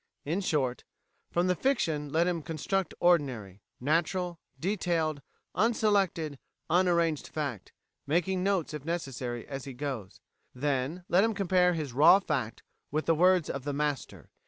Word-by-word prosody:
In 165 Hz, +7 st, -1 dB
short, 135 Hz, -9 st, 0 dB, 0.5 s
from 175 Hz, +1 st, +1 dB
the 185 Hz, -, +3 dB
fiction 165 Hz, -, 0 dB
let 165 Hz, +3 st, +3 dB
him 175 Hz, -2 st, 0 dB
construct 165 Hz, +4 st, -2 dB
ordinary, 130 Hz, -, +1 dB, 0.2 s
natural, 170 Hz, +4 st, 0 dB, 0.2 s
detailed, 170 Hz, -5 st, 0 dB, 0.3 s
unselected, 195 Hz, -, +1 dB, 0.3 s
unarranged 170 Hz, -3 st, +2 dB
fact, 140 Hz, -10 st, -4 dB, 0.4 s
making 180 Hz, +5 st, +1 dB
notes, 190 Hz, -5 st, 0 dB
if 150 Hz, -3 st, -5 dB
necessary, 130 Hz, -8 st, -4 dB
as 135 Hz, -2 st, -6 dB
he 135 Hz, -, -7 dB
goes. 125 Hz, -7 st, -5 dB, 0.4 s
Then 140 Hz, +5 st, -1 dB
let 185 Hz, +3 st, +4 dB
him 225 Hz, -1 st, +1 dB
compare 180 Hz, -2 st, +3 dB
his 150 Hz, -6 st, -4 dB
raw 150 Hz, +8 st, +8 dB
fact 145 Hz, -, -3 dB, 0.3 s
with 155 Hz, +2 st, -1 dB
the 165 Hz, -, +4 dB
words 180 Hz, 0 st, +4 dB
of 140 Hz, -, -4 dB
the 145 Hz, 0 st, -2 dB
master. 145 Hz, -1 st, -3 dB
160 Hz, 140 wpm, -29 LUFS, 140-180 Hz, 0.5 s, raw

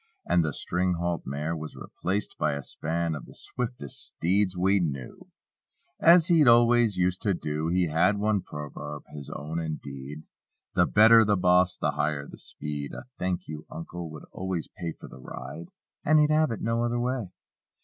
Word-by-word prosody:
And 85 Hz, -, +3 dB
the 80 Hz, -, -1 dB
string 90 Hz, +5 st, 0 dB
halt 85 Hz, 0 st, -2 dB
mare 75 Hz, +5 st, -2 dB
was 80 Hz, -1 st, -7 dB
replaced 100 Hz, +3 st, -3 dB
by 75 Hz, -, +1 dB
a 70 Hz, -1 st, -4 dB
span 85 Hz, +3 st, -2 dB
Of 75 Hz, -, -7 dB
the -, -, -14 dB
swiftest 125 Hz, -, -5 dB
steeds 95 Hz, +2 st, 0 dB
we 95 Hz, +2 st, +3 dB
knew; 70 Hz, -8 st, -4 dB
ii6 -, -, -43 dB, 0.2 s
As 170 Hz, -1 st, +8 dB
he 170 Hz, -4 st, +5 dB
always 120 Hz, -4 st, +5 dB
used 90 Hz, 0 st, +1 dB
to 100 Hz, -3 st, +1 dB
do. 75 Hz, -1 st, -3 dB
He 90 Hz, +1 st, +2 dB
had 85 Hz, +6 st, +2 dB
one 105 Hz, -1 st, +1 dB
proverb, 75 Hz, -1 st, -7 dB
his 70 Hz, -2 st, -8 dB
own 80 Hz, +3 st, -4 dB
indeed: 75 Hz, -2 st, -6 dB, 0.5 s
"The 90 Hz, -, +4 dB
better 110 Hz, +2 st, +7 dB
the 105 Hz, -1 st, +2 dB
boss 90 Hz, 0 st, +3 dB
the 75 Hz, -, 0 dB
higher 75 Hz, -1 st, -1 dB
the -, -, -12 dB
speed!" 75 Hz, -1 st, -5 dB
A -, -, -7 dB, 0.2 s
"Thank 90 Hz, -1 st, -2 dB
you 75 Hz, 0 st, -7 dB
Uncle" 85 Hz, +1 st, -7 dB
would 75 Hz, -1 st, -10 dB
always 95 Hz, -3 st, -3 dB
pay 85 Hz, -2 st, -4 dB
For -, -, -12 dB
the -, -, -12 dB
ride, 85 Hz, +5 st, -8 dB, 0.4 s
and 155 Hz, +1 st, +4 dB
he'd 150 Hz, 0 st, +4 dB
have 155 Hz, -1 st, +4 dB
it 115 Hz, -, -4 dB
no 115 Hz, +1 st, 0 dB
other 120 Hz, 0 st, 0 dB
way. 125 Hz, -5 st, -1 dB
90 Hz, 185 wpm, -27 LUFS, 75-105 Hz, 0.5 s, As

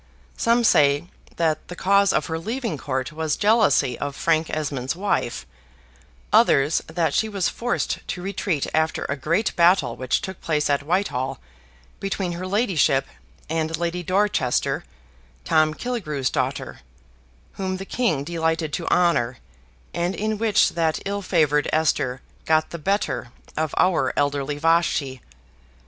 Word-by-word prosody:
Some 235 Hz, +1 st, +2 dB
say 145 Hz, -4 st, +4 dB, 0.3 s
that 160 Hz, -2 st, 0 dB
the 180 Hz, -, -8 dB
cause 200 Hz, +2 st, +3 dB
of -, -, +1 dB
her 160 Hz, -1 st, -3 dB
leaving 230 Hz, +1 st, -3 dB
Court 130 Hz, -1 st, -3 dB
was 160 Hz, -1 st, -1 dB
jealousy 210 Hz, -, +3 dB
of 140 Hz, -1 st, -4 dB
Frank 160 Hz, 0 st, +1 dB
Esmond's 140 Hz, -3 st, -2 dB
wife: 175 Hz, -, -1 dB, 0.9 s
others, 140 Hz, +3 st, +4 dB
that 165 Hz, 0 st, 0 dB
she 220 Hz, -, +1 dB
was 195 Hz, -4 st, 0 dB
forced 240 Hz, +1 st, -2 dB
to 180 Hz, -, -4 dB
retreat 190 Hz, -6 st, -1 dB
after 160 Hz, 0 st, 0 dB
a 140 Hz, -, -2 dB
great 170 Hz, +10 st, 0 dB
battle 170 Hz, -8 st, +4 dB
which 130 Hz, -1 st, 0 dB
took 190 Hz, -1 st, -7 dB
place 150 Hz, -2 st, 0 dB
at 140 Hz, -, +1 dB
Whitehall, 145 Hz, -5 st, -1 dB, 0.6 s
between 195 Hz, -2 st, -2 dB
her 175 Hz, +2 st, -5 dB
ladyship 185 Hz, -, +2 dB, 0.4 s
and 160 Hz, 0 st, -1 dB
Lady 170 Hz, +1 st, -2 dB
Dorchester, 185 Hz, -7 st, 0 dB, 0.6 s
Tom 155 Hz, -1 st, +3 dB
Killigrew's 155 Hz, -, -2 dB
daughter, -, -, -2 dB, 0.7 s
whom 185 Hz, -1 st, -3 dB
the 195 Hz, -, -7 dB
King 210 Hz, -, 0 dB
delighted 160 Hz, -1 st, -1 dB
to 170 Hz, -, -3 dB
honor, 165 Hz, -9 st, +2 dB, 0.6 s
and 175 Hz, +2 st, -1 dB
in 215 Hz, 0 st, -2 dB
which 220 Hz, -3 st, +3 dB
that 160 Hz, -2 st, 0 dB
ill 200 Hz, +1 st, -2 dB
favored 150 Hz, -6 st, +2 dB
Esther 130 Hz, -5 st, +1 dB, 0.2 s
got 155 Hz, 0 st, +2 dB
the 170 Hz, -, -6 dB
better 195 Hz, -, -1 dB, 0.2 s
of 155 Hz, -1 st, -1 dB
our 185 Hz, -2 st, +2 dB
elderly 145 Hz, 0 st, 0 dB
Vashti. 150 Hz, -5 st, +1 dB
165 Hz, 140 wpm, -23 LUFS, 145-190 Hz, 0.9 s, say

